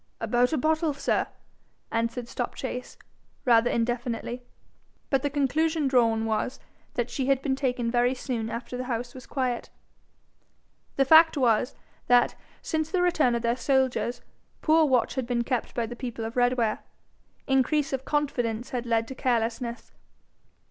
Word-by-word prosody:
'About 245 0 +2
a 315 - +1
bottle, 310 +1 +1
sir,' 280 - 0 0.6
answered 230 +1 -1
Stopchase, 250 +1 -5 0.5
rather 235 -1 +5
indefinitely; 240 +1 -2 0.7
but 270 -2 +3
the 285 - 0
conclusion 300 +2 +1
drawn 230 -4 +3
was, 220 +3 -1 0.4
that 240 0 -1
she 260 +1 -2
had 275 -1 +3
been 270 -3 +1
taken 250 -4 -1
very 245 +1 +2
soon 235 -4 -3
after 235 +2 -5
the 250 0 -4
house 240 -1 -3
was 255 -2 -11
quiet. 255 -3 -2 1.3
The 270 - +3
fact 320 +2 +7
was, 245 -1 +2 0.3
that 245 0 +5 0.3
since 315 -1 -1
the 365 0 +1
return 310 -9 +3
of 235 - -2
their 235 0 +2
soldiers, 260 -2 0 0.4
poor 315 0 +5
watch 255 -4 +2
had 260 -3 -3
been 240 -1 0
kept 250 -1 -2
by 235 - 0
the 240 +2 -7
people 240 -2 -5
of 225 - -6
Redware. 245 -3 +2 0.7
Increase 275 +2 +1
of 265 -1 -2
confidence 245 -6 -1
had 245 -1 -3
led 225 -1 +1
to - - -5
carelessness. 235 -1 -2
250 Hz, 150 wpm, -27 LUFS, 235-270 Hz, 1.3 s, fact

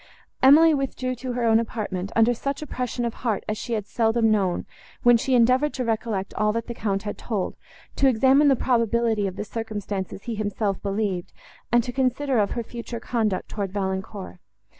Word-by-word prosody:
Emily 310 +5 +7
withdrew 265 -2 -2
to 255 0 -5
her 245 0 -2
own 225 0 +5
apartment, 205 -4 -3
under 230 +2 +4
such 275 +5 -3
oppression 250 -4 -3
of 235 - -2
heart 225 -5 -2
as 215 - -1
she 215 +3 -5
had 210 -3 -1
seldom 225 0 +2
known, 190 -4 +1 0.4
when 240 0 +7
she 255 +3 +1
endeavoured 255 +5 +3
to 255 - -2
recollect 220 -3 -2
all 210 0 +1
that 230 0 -2
the 235 - -5
Count 200 -3 -2
had 205 - -5
told, 210 -6 -3 0.4
to 275 - +4
examine 265 +4 +5
the 275 - +5
probability 230 -4 +1
of 185 - -5
the 210 +1 -4
circumstances 205 -4 -5
he 235 - -4
himself 205 -2 -2
believed, 200 -3 -2 0.4
and 240 0 +4
to 245 - -4
consider 260 0 +1
of 200 -1 +2
her 235 - -1
future 235 0 -7
conduct 220 -5 -1
towards 200 -3 -4
Valancourt. 190 -1 -4
225 Hz, 185 wpm, -24 LUFS, 205-245 Hz, 0.4 s, Emily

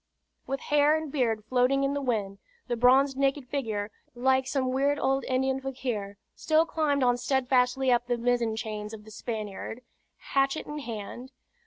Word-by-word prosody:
With 275 0 -3
hair 295 +1 +3
and 315 -2 -5
beard 225 -7 0
floating 255 +3 +2
in 275 0 +1
the 285 - -2
wind, 205 -7 -2 0.3
the 240 - -1
bronzed 260 +3 +4
naked 275 -1 +1
figure, 220 -6 -3 0.2
like 260 +1 +2
some 260 -2 0
weird 280 +2 +1
old 270 -1 +1
Indian 265 +1 0
fakir, 245 -7 -4 0.2
still 315 +1 +2
climbed 295 -4 0
on 245 -1 +3
steadfastly 255 0 +2
up 240 0 +2
the 245 -1 0
mizzen 235 -2 +1
chains 215 -1 -5
of 210 -1 -14
the 215 - -12
Spaniard, 215 +1 -5 0.4
hatchet 275 +2 0
in 300 0 -5
hand. 240 +1 -7
255 Hz, 165 wpm, -28 LUFS, 230-275 Hz, 0.4 s, bronzed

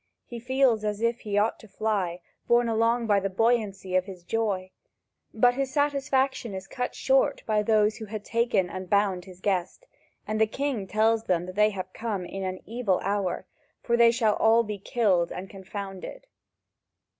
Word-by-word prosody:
He 240 - -8
feels 250 -2 +2
as 210 -1 -2
if 230 +1 +1
he 205 -1 -3
ought 210 +2 +1
to 220 - -14
fly, 195 -5 -2 0.3
borne 240 0 +4
along 230 +1 +2
by 205 -2 +3
the 195 0 -2
buoyancy 195 -3 0
of 185 0 +3
his 185 -3 -10
joy. 195 -2 -1 0.6
But 245 +2 +4
his 270 +1 -2
satisfaction 270 -5 0
is 190 0 -6
cut 250 +5 -4
short 265 0 +2
by 215 -1 +2
those 215 0 +2
who 220 - -7
had 210 0 -7
taken 230 -5 +1
and 185 0 -7
bound 200 -3 +1
his 185 -2 -13
guest, 190 - -1 0.4
and 215 +1 -2
the 220 - +5
king 255 -4 -2
tells 220 +3 +2
them 175 -1 +1
they 210 +2 +4
have 185 -2 -6
come 210 -5 -3
in 195 +2 -6
an 185 0 -4
evil 225 -5 0
hour, 200 -2 -1 0.4
for 235 - +2
they 235 0 +6
shall 230 -2 +2
all 225 +1 +4
be 210 -2 -5
killed 190 -5 +1
and 190 +1 -7
confounded. 195 - -8
215 Hz, 180 wpm, -27 LUFS, 190-235 Hz, 0.6 s, they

